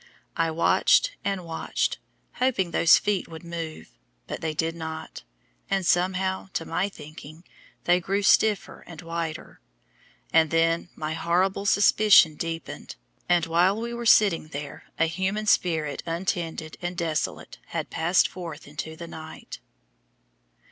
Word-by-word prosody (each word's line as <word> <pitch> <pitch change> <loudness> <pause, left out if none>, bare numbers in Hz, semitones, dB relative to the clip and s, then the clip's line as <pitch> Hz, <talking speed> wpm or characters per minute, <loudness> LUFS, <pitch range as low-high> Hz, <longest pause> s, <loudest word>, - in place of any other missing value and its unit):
I 165 0 +1
watched - - +3
and 195 -3 -2
watched, 165 -1 -2 0.4
hoping 235 -9 +1
those 170 - +6
feet 205 -2 -1
would 160 0 -10
move, 165 - -7 0.3
but - - -6
they 160 -1 -2
did 165 +1 -1
not; 160 -1 -7 0.5
and 195 -2 0
somehow, 190 +2 +1
to 165 - -2
my 195 +3 -1
thinking, 155 -1 -12 0.4
they 175 +1 +4
grew 195 +3 -1
stiffer 210 0 +2
and 165 -3 -10
whiter, 165 -1 -5 0.7
and 160 -1 +5
then 165 +2 +1
my 155 0 -3
horrible 185 +5 0
suspicion 205 -5 +6
deepened, 165 +1 -6 0.3
and 175 -2 +3
while 175 +5 +2
we 235 +1 -4
were 235 0 -3
sitting 200 -8 +5
there 145 -2 -7
a 165 - +3
human 190 +6 -2
spirit 160 -7 +1
untended 165 -2 -3
and 175 0 -4
desolate 165 -3 -3
had - - -4
passed 170 +3 +3
forth 165 -6 -8
into 150 +2 -6
the 170 +1 -8
night. 160 -1 -9
170 Hz, 135 wpm, -26 LUFS, 160-190 Hz, 0.7 s, those